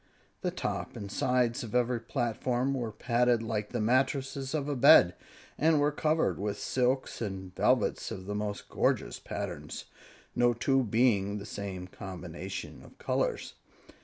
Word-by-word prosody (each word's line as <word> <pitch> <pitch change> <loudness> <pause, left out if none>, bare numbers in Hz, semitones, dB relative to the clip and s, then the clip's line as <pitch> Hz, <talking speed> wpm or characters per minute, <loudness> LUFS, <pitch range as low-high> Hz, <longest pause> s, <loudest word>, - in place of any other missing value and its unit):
The - - 0
top - - -4
and 100 -1 -6
sides 125 -1 +1
of 115 0 -6
every 125 0 +2
platform 120 +2 -1
were 120 -4 -2
padded 120 +1 +2
like 105 -2 -2
the 120 - -3
mattresses 135 +4 +1
of 145 -2 -1
a 145 - -1
bed, 90 -7 +7 0.5
and 160 0 +4
were 145 +1 +3
covered 155 +2 +1
with 100 0 -2
silks 130 0 0
and 95 -4 -5
velvets - - +2
of 95 0 -6
the 105 - -4
most 105 0 -3
gorgeous - - 0
patterns, - - -5 0.5
no 120 0 +4
two 135 +3 +2
being 110 -3 +2
of - - -3
the 100 - -7
same 95 -3 -5
combinations 90 -1 -7
of - - -16
colors. - - -1
120 Hz, 155 wpm, -30 LUFS, 100-130 Hz, 0.5 s, bed